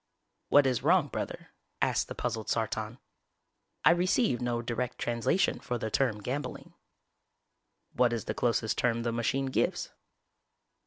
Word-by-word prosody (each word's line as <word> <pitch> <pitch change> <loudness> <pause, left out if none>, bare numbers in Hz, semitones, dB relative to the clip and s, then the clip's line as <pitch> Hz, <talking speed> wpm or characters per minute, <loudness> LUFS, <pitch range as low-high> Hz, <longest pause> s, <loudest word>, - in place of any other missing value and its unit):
"What 145 -1 +6
is 130 -3 +1
wrong, 160 +1 +3
Brother?" - - -5 0.3
asked - - +1
the - - -7
puzzled 110 -1 -3
Sartan. 110 0 -2 0.9
"I 155 - +8
receive 180 - +2
no 120 -1 -1
direct 120 +1 -3
translation 120 +11 +1
for 120 - -3
the 110 -1 -4
term 110 -6 +1
'gambling'." 140 +6 -4 1.2
"_What 125 -1 +4
is 115 -2 -2
the - - -2
closest 115 -2 0
term 115 -1 +1
the 120 - 0
machine 120 +4 0
gives? 130 - -1
120 Hz, 140 wpm, -30 LUFS, 115-135 Hz, 1.2 s, I